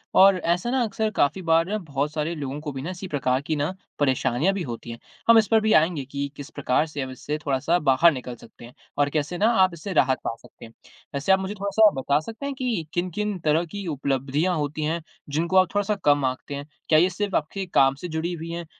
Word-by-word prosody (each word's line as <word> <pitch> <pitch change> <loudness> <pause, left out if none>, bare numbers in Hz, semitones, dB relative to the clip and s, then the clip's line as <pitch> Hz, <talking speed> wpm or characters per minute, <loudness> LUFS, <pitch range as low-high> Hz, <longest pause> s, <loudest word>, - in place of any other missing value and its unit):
और 195 0 +7
ऐसा 175 +7 0
ना 260 -1 +1
अक्सर 220 0 -1
काफ़ी 145 +7 +1
बार 165 +4 +2
बहुत 145 -5 -3
सारे 155 +2 -2
लोगों 140 -1 -5
को 150 -2 -5
भी 135 +6 -5
इसी 190 +2 -7
प्रकार 130 -5 0
की 155 +2 -2
ना 150 +5 -1 0.3
परेशानियाँ 135 +5 +1
भी 195 - -3
होती 120 -3 -6
हैं। 115 - -8 0.3
हम 230 - +9
इस 215 - +4
पर 225 -1 +4
भी 220 0 +2
आएँगे 160 -4 +3
कि 140 +1 -4
किस 145 +2 -9
प्रकार 145 -1 0
से 145 -2 -5
अब 130 - -4
इससे 150 +4 -4
थोड़ा-सा 140 +5 +1
बाहर 150 +3 +5
निकल 125 -3 -6
सकते 120 0 -15
हैं 120 - -14 0.2
और 145 0 +2
कैसे 155 +4 -2
ना 210 - +3 0.2
आप 185 -2 +2
इससे 175 +4 -6
राहत 130 -4 +3
पा - - -2
सकते - - -14
हैं। 115 - -14 0.4
वैसे 140 +7 0
आप 190 - +5
मुझे 190 +2 -4
थोड़ा-सा 200 +2 +4
बता 140 +3 +2
सकते 225 - -8
हैं 280 -1 -3
कि 240 -10 -2
किन-किन 185 +3 -2
तरह 160 +3 +3
की 200 +4 -7
उपलब्धियाँ 140 +4 0
होती 150 +1 -2
हैं 165 +2 -1 0.3
जिनको 170 +6 0
आप 185 -1 +6
थोड़ा-सा 205 +1 +1
कम 145 -2 +4
आँकते 130 +2 -3
हैं? 140 0 -6 0.2
क्या 155 -1 +6
ये 180 +2 +4
सिर्फ़ 200 +2 -3
आपके 190 +6 -2
काम 135 0 +5
से 180 - -7
जुड़ी 165 +2 -3
हुई 165 0 -6
हैं? 170 0 -5
160 Hz, 235 wpm, -24 LUFS, 140-190 Hz, 0.4 s, हम